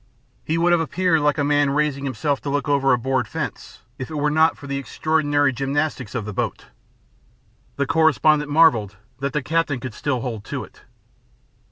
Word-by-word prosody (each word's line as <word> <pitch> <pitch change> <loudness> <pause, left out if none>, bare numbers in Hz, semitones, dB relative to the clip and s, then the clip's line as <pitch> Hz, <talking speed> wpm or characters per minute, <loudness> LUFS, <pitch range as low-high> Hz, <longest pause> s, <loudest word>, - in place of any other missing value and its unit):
He 160 - -1
would 175 +1 +3
have 175 -1 +4
appeared 180 0 +1
like 145 -1 +2
a 145 - +1
man 145 0 +2
raising 140 -1 0
himself 140 +1 -1
to 145 - -4
look 145 +2 -1
over 140 -1 +2
a 125 - +4
board 130 +2 -1
fence, - - -6 0.2
if 130 - -5
it 155 - -6
were 150 0 +1
not 160 +2 +3
for 145 - -12
the 140 0 -3
extraordinary 145 0 +1
gymnastics 135 -2 -2
of 115 -4 -2
the 105 - -5
boat. - - -3 1.1
The 140 - 0
correspondent 155 -1 +3
marvelled 140 -10 +4 0.2
that 140 0 -3
the 150 - -1
captain 160 -3 0
could 125 -1 -6
still 130 -1 -2
hold 115 -5 -5
to - - -4
it. - - -16
145 Hz, 190 wpm, -22 LUFS, 135-155 Hz, 1.1 s, have